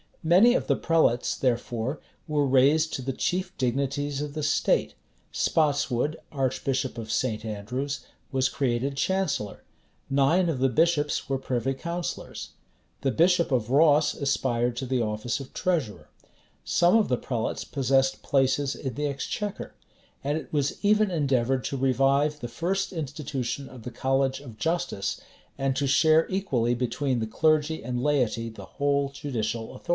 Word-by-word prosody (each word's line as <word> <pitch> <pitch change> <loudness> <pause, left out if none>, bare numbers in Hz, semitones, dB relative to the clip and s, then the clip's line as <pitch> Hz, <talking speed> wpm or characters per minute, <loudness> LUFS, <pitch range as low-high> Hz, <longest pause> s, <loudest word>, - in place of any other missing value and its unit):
Many 185 +9 +6
of - - 0
the - - +3
prelates, 160 -7 +2
therefore, 120 +1 -1 0.3
were 150 -2 +1
raised 140 +4 +3
to - - -2
the 135 +1 -3
chief 180 +6 -2
dignities 140 +3 -1
of 150 -1 -4
the 155 - -3
state;[*] - - +1 0.4
Spotswood, 145 -2 +1 0.2
archbishop 130 -1 -1
of 110 -1 -6
St. 115 -4 -1
Andrews, 125 +6 -4 0.3
was 130 -1 +2
created 135 +1 -1
chancellor: 150 - -1 0.5
nine 140 +7 +3
of 155 - -1
the 135 +1 +3
bishops 150 +2 +1
were 135 -1 0
privy 130 0 -1
councillors: 170 +5 -5 0.5
the 135 - +1
bishop 170 +5 +3
of 120 -4 +1
Ross 150 +1 +5
aspired 125 -4 0
to 135 - -3
the 130 -1 0
office 110 +3 -2
of 135 - -10
treasurer: 125 - -2 0.5
some 175 +4 +3
of 225 -2 +4
the 125 - +1
prelates 115 -3 -3
possessed 135 -1 +1
places 135 +1 +1
in 130 -3 -5
the 150 +5 -1
exchequer: 190 +8 -4 0.5
and 145 +2 0
it 155 - -8
was 145 -2 0
even 210 0 +4
endeavored 135 -6 +1
to 140 - -2
revive 135 +3 +2
the 120 - -5
first 180 +10 -2
institution 140 -4 -4
of 125 -3 -12
the 125 - -6
college 135 +1 0
of 125 -6 -11
justice, 165 - -1 0.4
and 135 -1 0
to 140 +1 0
share 160 +3 +4
equally 135 -12 0
between 125 +1 -1
the 110 - -2
clergy 155 +6 +1
and 125 0 -2
laity 125 -6 +1
the 110 - -10
whole 140 -1 0
judicial 115 -5 -4
authority. - - -14
135 Hz, 150 wpm, -26 LUFS, 125-155 Hz, 0.5 s, Many